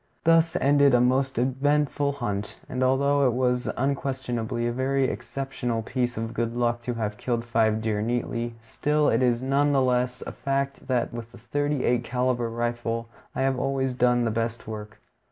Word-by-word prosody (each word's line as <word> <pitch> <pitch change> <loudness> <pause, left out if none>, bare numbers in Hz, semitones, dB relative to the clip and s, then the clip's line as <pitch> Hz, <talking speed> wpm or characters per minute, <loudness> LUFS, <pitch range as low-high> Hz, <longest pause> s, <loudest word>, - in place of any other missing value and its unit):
Thus 165 0 +4
ended 140 -1 +4
a - - +5
most 130 +1 +2
eventful 140 +3 +1
hunt; 105 -6 -4
and 130 0 -2
although 140 +2 +3
it 125 - +1
was 125 0 +1
unquestionably 130 -4 -1
a 120 - +1
very 135 +2 0
exceptional 130 -3 -3
piece 125 0 -2
of 115 +1 -3
good 115 0 -2
luck 120 -1 0
to 120 0 -3
have 105 -2 -3
killed 120 0 -2
five 110 -2 +1
deer 105 -2 0
neatly, 120 0 -2
still 150 +5 +1
it - - +2
is 125 -1 +2
none 140 +2 +2
the 135 - +4
less 125 0 0
a - - -5
fact 140 0 -2
that 125 -3 0
with 120 -1 -7
a - - -11
thirty 145 +4 -1
eight 120 -1 +2
caliber 125 -1 0
rifle 115 0 -2 0.3
I - - -1
have 135 -1 +1
always 135 -1 0
done 125 -1 +2
the 115 - +1
best 115 +1 -2
work. 105 -1 -7
125 Hz, 180 wpm, -26 LUFS, 115-135 Hz, 0.3 s, a